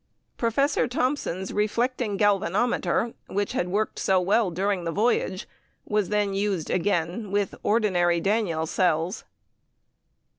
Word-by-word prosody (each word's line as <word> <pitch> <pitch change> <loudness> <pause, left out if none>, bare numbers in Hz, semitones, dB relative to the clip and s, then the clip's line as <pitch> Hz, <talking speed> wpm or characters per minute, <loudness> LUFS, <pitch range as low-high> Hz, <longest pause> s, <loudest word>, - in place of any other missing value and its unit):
Professor 245 +5 +1
Thomson's 245 - -2
reflecting 220 +1 0
galvanometer, 210 +3 +1
which 205 0 -2
had 175 - -1
worked 205 +4 -1
so 190 -1 +3
well 200 +3 +2
during 190 +1 -1
the 165 - -2
voyage, 200 -2 0 0.4
was 210 -3 0
then 205 -1 +1
used 195 -5 -1
again 185 +2 -1
with 200 0 0
ordinary 180 -6 +2
Daniell 195 -5 0
cells. 175 +2 0
205 Hz, 115 wpm, -25 LUFS, 180-215 Hz, 0.4 s, so